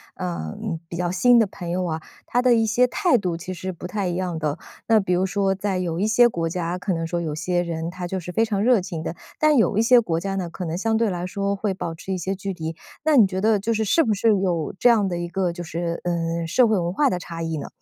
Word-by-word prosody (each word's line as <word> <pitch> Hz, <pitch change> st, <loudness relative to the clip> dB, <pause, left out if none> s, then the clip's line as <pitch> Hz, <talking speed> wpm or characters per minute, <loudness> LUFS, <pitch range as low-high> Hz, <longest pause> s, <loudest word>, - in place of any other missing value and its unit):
嗯， 185 Hz, +1 st, -4 dB
比 170 Hz, -, -7 dB
较 175 Hz, 0 st, -1 dB
新 245 Hz, +5 st, +5 dB
的 220 Hz, -, +3 dB
朋 175 Hz, -3 st, -7 dB
友 185 Hz, +1 st, 0 dB
啊， 160 Hz, -2 st, -2 dB, 0.3 s
他 245 Hz, -, +1 dB
的 250 Hz, -1 st, +5 dB
一 225 Hz, -1 st, +3 dB
些 225 Hz, +3 st, +3 dB
态 350 Hz, +2 st, +2 dB
度 180 Hz, -5 st, -2 dB
其 180 Hz, +2 st, -7 dB
实 185 Hz, +1 st, -4 dB
不 180 Hz, 0 st, -8 dB
太 200 Hz, 0 st, -2 dB
一 175 Hz, -, -1 dB
样 180 Hz, -2 st, -2 dB
的。 150 Hz, -1 st, -2 dB, 0.3 s
那 225 Hz, -1 st, +5 dB
比 185 Hz, -2 st, 0 dB
如 180 Hz, +1 st, +2 dB
说 195 Hz, 0 st, 0 dB
在 190 Hz, -1 st, -2 dB
有 170 Hz, -1 st, -2 dB
一 205 Hz, -, +1 dB
些 240 Hz, +2 st, +5 dB
国 165 Hz, -6 st, -2 dB
家， 170 Hz, +1 st, -2 dB
可 185 Hz, +1 st, -2 dB
能 165 Hz, -1 st, -2 dB
说 175 Hz, +1 st, -2 dB
有 160 Hz, -3 st, -3 dB
些 175 Hz, +3 st, -1 dB
人 165 Hz, -1 st, -3 dB
他 180 Hz, 0 st, -6 dB
就 190 Hz, +2 st, -3 dB
是 180 Hz, 0 st, -7 dB
非 225 Hz, +6 st, +2 dB
常 205 Hz, -3 st, -1 dB
热 245 Hz, -1 st, +5 dB
情 175 Hz, -3 st, -5 dB
的， 160 Hz, -, -4 dB, 0.2 s
但 305 Hz, -1 st, +4 dB
有 215 Hz, -2 st, +3 dB
一 -, -, +5 dB
些 240 Hz, +2 st, +6 dB
国 165 Hz, -7 st, -1 dB
家 195 Hz, +2 st, -3 dB
呢， 185 Hz, -2 st, -2 dB
可 170 Hz, +2 st, -7 dB
能 165 Hz, +1 st, -3 dB
相 225 Hz, +4 st, 0 dB
对 225 Hz, 0 st, +2 dB
来 175 Hz, -1 st, -3 dB
说 200 Hz, +2 st, -2 dB
会 200 Hz, 0 st, -1 dB
保 165 Hz, -3 st, -5 dB
持 190 Hz, +4 st, -5 dB
一 -, -, -1 dB
些 190 Hz, +3 st, -2 dB
距 195 Hz, +1 st, -4 dB
离。 160 Hz, -2 st, -5 dB, 0.3 s
那 310 Hz, -2 st, +4 dB
你 225 Hz, -, +8 dB
觉 190 Hz, 0 st, -3 dB
得 215 Hz, +1 st, +3 dB
就 225 Hz, +4 st, -1 dB
是， 220 Hz, -, 0 dB
是 325 Hz, +10 st, +3 dB
不 220 Hz, -, +1 dB
是 205 Hz, +3 st, 0 dB
有 175 Hz, -5 st, -1 dB
这 245 Hz, -, +3 dB
样 220 Hz, -4 st, +4 dB
的 175 Hz, -2 st, -2 dB
一 175 Hz, 0 st, -3 dB
个 180 Hz, +1 st, -1 dB
就 175 Hz, +1 st, -7 dB
是， 170 Hz, 0 st, -3 dB
呃， 170 Hz, -1 st, -1 dB
社 235 Hz, +9 st, +4 dB
会 215 Hz, -2 st, +2 dB
文 175 Hz, -1 st, -1 dB
化 285 Hz, +8 st, +3 dB
的 180 Hz, -, -1 dB
差 165 Hz, -1 st, -7 dB
异 165 Hz, -1 st, -2 dB
呢？ 145 Hz, -, -5 dB
185 Hz, 305 characters per minute, -23 LUFS, 170-215 Hz, 0.3 s, 你